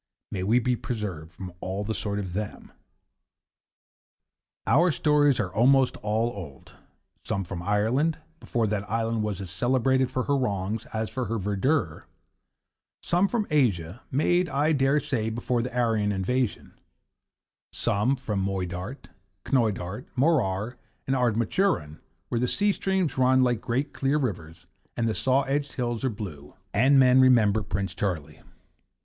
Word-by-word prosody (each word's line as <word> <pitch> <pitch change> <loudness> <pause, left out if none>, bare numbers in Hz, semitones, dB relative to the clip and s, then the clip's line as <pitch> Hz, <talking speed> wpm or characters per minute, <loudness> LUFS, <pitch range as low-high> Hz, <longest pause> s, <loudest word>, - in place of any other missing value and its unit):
May 95 - -3
we 105 +6 +3
be 125 0 +1
preserved 100 -10 -5
from 90 +1 -8
all 95 +2 -3
the 110 +2 -2
sort 105 -1 -3
of 95 -4 -4
them! 105 +2 -5 1.9
Our 170 +6 +4
stories 145 -1 +3
are 95 -4 -2
almost 130 +4 +4
all 110 +3 0
old, 85 - -10 0.5
some 100 - -2
from 90 -1 -6
Ireland, 110 - +1 0.2
before 115 -2 -1
that 100 -1 -2
island 115 0 0
was 105 -3 -2
as 95 -2 -7
celebrated 130 +5 +2
for 130 - -1
her 140 - +1
wrongs 105 -4 -2
as 110 -3 -3
for 130 -2 -2
her 115 +1 -2
verdure; 100 - -1 1.0
some 180 +3 +2
from 220 0 -1
Asia, 105 - +1
made, 175 +6 +2
I 145 +3 +1
dare 140 0 +3
say, 130 -7 -1
before 120 +1 -1
the 125 +1 -5
Aryan 110 -4 +1
invasion; 105 +5 -1 1.0
some 110 +7 +1
from 110 -7 -3
Moydart, 95 +5 -4 0.4
Knoydart, 110 -4 -1
Morar 120 - +1 0.3
and 135 - 0
Ardnamurchan, 120 - 0 0.3
where 120 - 0
the 125 - +1
sea 205 +9 +2
streams 190 -8 -1
run 130 0 +4
like 120 -3 +1
great 130 +5 -2
clear 140 +2 +1
rivers 85 - -4 0.3
and 115 -1 +1
the 110 - +1
saw 130 +4 +2
edged 140 +1 -2
hills 120 -2 -2
are 130 - +2
blue, 90 - -8 0.2
and 130 +7 +5
men 130 -1 +6
remember 110 -5 +4
Prince 95 -1 -3
Charlie. 80 -7 -3
115 Hz, 145 wpm, -26 LUFS, 100-130 Hz, 1.9 s, men